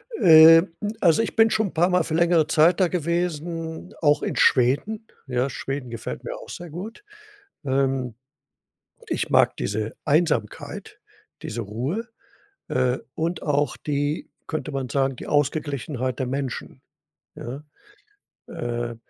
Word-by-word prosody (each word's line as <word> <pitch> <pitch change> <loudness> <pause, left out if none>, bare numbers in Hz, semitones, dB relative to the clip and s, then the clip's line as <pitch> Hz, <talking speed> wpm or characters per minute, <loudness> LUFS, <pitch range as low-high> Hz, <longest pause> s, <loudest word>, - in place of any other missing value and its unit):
Äh, 165 - +8 0.4
also, 170 +2 +4
ich - - -3
bin 225 0 +5
schon 220 -1 +1
'n - - -9
paar 175 +3 +3
Mal 180 -2 +3
für 160 - -5
längere 170 -1 +3
Zeit 160 +4 +4
da 185 - +4
gewesen, 165 -1 -3
auch 145 -1 +3
in - - -2
Schweden 145 - +2 0.2
ja, 125 +1 0
Schweden 135 0 -5
gefällt 115 -1 -6
mir - - -5
auch - - -12
sehr 175 -1 -8
gut, 200 - -8 0.6
ähm, 135 -2 0 1.0
ich - - -1
mag - - +4
diese 105 +2 -3
Einsamkeit, 155 +2 -1 0.4
diese 115 +1 -4
Ruhe, 130 - -3 0.6
äh, 125 0 +1 0.2
und 165 +1 -2
auch 145 0 0
die 145 +1 -2 0.2
könnte 155 -1 -4
man 135 -2 -3
sagen, 135 +1 0
die - - -9
Ausgeglichenheit 140 -3 -1
der 130 - -1
Menschen, 135 -1 -4 0.5
ja? 130 +5 -7 0.9
Äh, 120 0 -4
150 Hz, 135 wpm, -24 LUFS, 130-170 Hz, 1.0 s, Äh